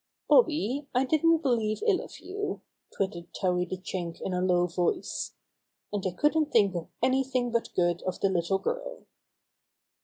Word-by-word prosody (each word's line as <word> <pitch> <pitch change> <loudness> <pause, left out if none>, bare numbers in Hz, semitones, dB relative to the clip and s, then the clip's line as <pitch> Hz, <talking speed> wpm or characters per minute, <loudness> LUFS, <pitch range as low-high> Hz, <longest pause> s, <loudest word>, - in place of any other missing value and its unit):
''Bobby, 295 - +3
I 255 +2 +3
didn't 320 +3 +3
believe 225 - +1
ill 415 -5 +3
of - - -11
you," 410 +2 -4 0.3
twitted 185 -3 -3
Towhee 180 -1 0
the 185 - -3
Chewink 180 -2 -5
in 190 - -2
a 180 - 0
low 180 -1 +3
voice. 175 0 -2 0.6
"And 205 -2 -1
I - - -1
couldn't 300 0 +2
think 200 -4 +4
of 170 -2 -4 0.2
anything 260 -2 +1
but 235 0 0
good 175 -1 +2
of 185 -1 -3
the 195 - +2
little 185 +1 +1
girl." - - -4
215 Hz, 160 wpm, -28 LUFS, 180-295 Hz, 0.6 s, think